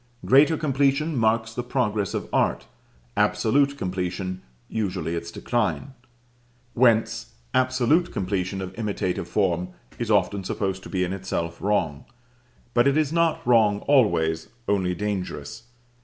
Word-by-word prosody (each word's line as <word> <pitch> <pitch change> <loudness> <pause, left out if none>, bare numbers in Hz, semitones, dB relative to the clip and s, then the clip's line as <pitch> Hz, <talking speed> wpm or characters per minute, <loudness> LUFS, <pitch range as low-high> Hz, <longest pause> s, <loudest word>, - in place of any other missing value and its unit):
Greater 145 +5 +5
completion 145 +2 +1
marks 110 -1 +1
the 120 - -2
progress 110 -6 -1
of - - -3
art, - - +1 0.5
absolute 140 +4 +2
completion 95 -1 -3 0.3
usually 90 -7 -2
its 85 0 -4
decline; 120 +7 -2 0.8
whence 115 -2 +2 0.2
absolute 130 +6 +2
completion 95 0 -2
of 95 0 -7
imitative 95 -5 -2
form 90 -4 0 0.3
is 120 -2 -2
often 100 -1 +2
supposed 95 -1 -2
to - - -10
be 95 -2 0
in 90 +1 -2
itself 85 -3 -4
wrong. 90 -8 0 0.7
But 120 +2 +4
it 140 +2 +3
is 155 -1 +1
not 165 -1 +1
wrong 110 -4 +4
always, 85 - +2 0.2
only 95 -3 +1
dangerous. 100 +1 -4
105 Hz, 125 wpm, -24 LUFS, 90-125 Hz, 0.8 s, Greater